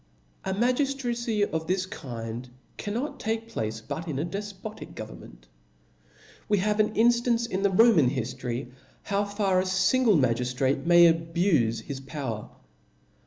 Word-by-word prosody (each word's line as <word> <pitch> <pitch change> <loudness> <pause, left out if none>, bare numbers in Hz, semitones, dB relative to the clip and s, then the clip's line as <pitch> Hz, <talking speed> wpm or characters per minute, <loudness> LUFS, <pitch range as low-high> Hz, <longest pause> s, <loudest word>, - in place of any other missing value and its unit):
Magiftracy 240 0 0
of 160 0 -3
this 185 0 0
kind 120 -7 -7 0.3
cannot 235 +8 -4
take 225 +1 -3
placfe 110 - -3
but 165 +2 -4
in 150 -4 -3
a 145 - -1
defpotic 205 +3 -7
government. - - -10 1.0
We 205 - +4
have 210 +2 0
an 215 0 +2
inftance 235 0 +3
in 190 -4 -2
the 200 - +3
Roman 190 - +5
hiftory 125 0 -4 0.3
how 200 0 0
far 200 -2 +1
a - - +2
fingje 190 - +3
magiftrate 130 +3 0
may 175 -1 +7
abufe 165 - +1
his 140 -2 -6
power. 130 -5 -5
185 Hz, 130 wpm, -27 LUFS, 130-215 Hz, 1.0 s, may